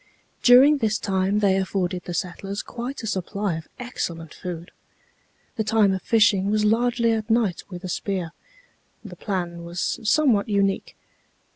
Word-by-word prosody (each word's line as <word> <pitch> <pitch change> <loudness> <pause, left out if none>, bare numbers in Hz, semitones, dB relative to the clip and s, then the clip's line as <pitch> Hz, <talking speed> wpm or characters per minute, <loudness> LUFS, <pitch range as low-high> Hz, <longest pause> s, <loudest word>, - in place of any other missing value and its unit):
During 270 +4 +7
this 220 -2 +1
time 195 0 0
they 195 -2 +3
afforded 185 -2 -2
the 175 - -4
settlers 195 +3 -4
quite 245 +2 -6
a - - -3
supply 200 -2 -2
of 160 - -14
excellent 170 - -5
food. 175 -2 -7 0.9
The 220 - +1
time 215 -2 +3
of 190 - -3
fishing 210 -3 +3
was 215 0 +1
largely 235 +1 +2
at 220 0 -2
night 225 -6 +1
with 180 -1 -8
a - - -4
spear. 180 -2 -3 0.7
The 185 -4 -9
plan 175 -3 -4
was 170 +1 -3
somewhat 225 -3 +2
unique. 200 -1 0
200 Hz, 150 wpm, -24 LUFS, 180-225 Hz, 0.9 s, During